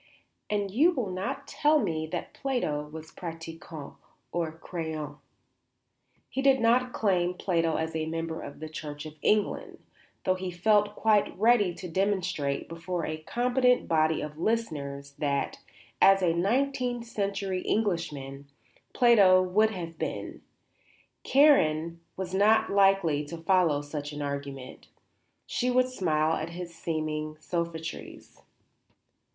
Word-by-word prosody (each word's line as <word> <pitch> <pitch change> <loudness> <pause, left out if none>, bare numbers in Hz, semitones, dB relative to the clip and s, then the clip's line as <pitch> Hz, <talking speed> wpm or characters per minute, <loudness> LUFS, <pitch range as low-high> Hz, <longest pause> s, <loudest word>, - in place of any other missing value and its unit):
"And 205 -2 -1
you 290 - +5
will 235 - -2
not 250 +10 -4
tell 300 +1 +3
me 160 - -1
that - - -5
Plato 155 - -2
was 160 0 -9
pratiquant 165 -3 -8 0.3
or 165 -2 -1
croyant." 160 -3 -5 1.1
He 270 - -3
could 270 -1 +4
not 245 +2 +3
claim 180 -5 +1
Plato 165 -4 0
as 160 0 -2
a 160 0 -1
member 165 0 -3
of 140 - -9
the 155 - -4
Church 150 -1 -7
of 155 - -8
England, 210 -1 +1 0.5
though 185 - +3
he 185 0 -4
felt 205 +3 +2
quite 215 -4 +2
ready 215 -2 +4
to 185 - -7
demonstrate, 185 -6 -1
before 165 +1 -4
a 155 - -3
competent 250 +7 +2
body 160 -1 +2
of 150 +1 -7
listeners, 145 -10 -2
that, 140 -2 -1 0.4
as 195 -1 +6
a 170 -2 +3
nineteenth 245 +5 0
century 200 -4 -2
Englishman, 150 -11 -2 0.5
Plato 205 -7 +6
would 210 +4 +3
have 170 -6 -7
been. - - -4 0.8
Karen 170 - +4 0.2
was 185 -1 -4
not 210 +3 +4
likely 195 -7 +3
to 170 +3 -7
follow 165 -4 +2
such 145 0 -5
an 145 0 -4
argument. 140 -2 -6 0.6
She 250 - -1
would 255 0 +3
smile 160 -9 +1
at 155 +1 -4
his 170 0 -7
seeming 155 -2 -3
sophistries. 165 -1 -5
175 Hz, 130 wpm, -28 LUFS, 155-210 Hz, 1.1 s, as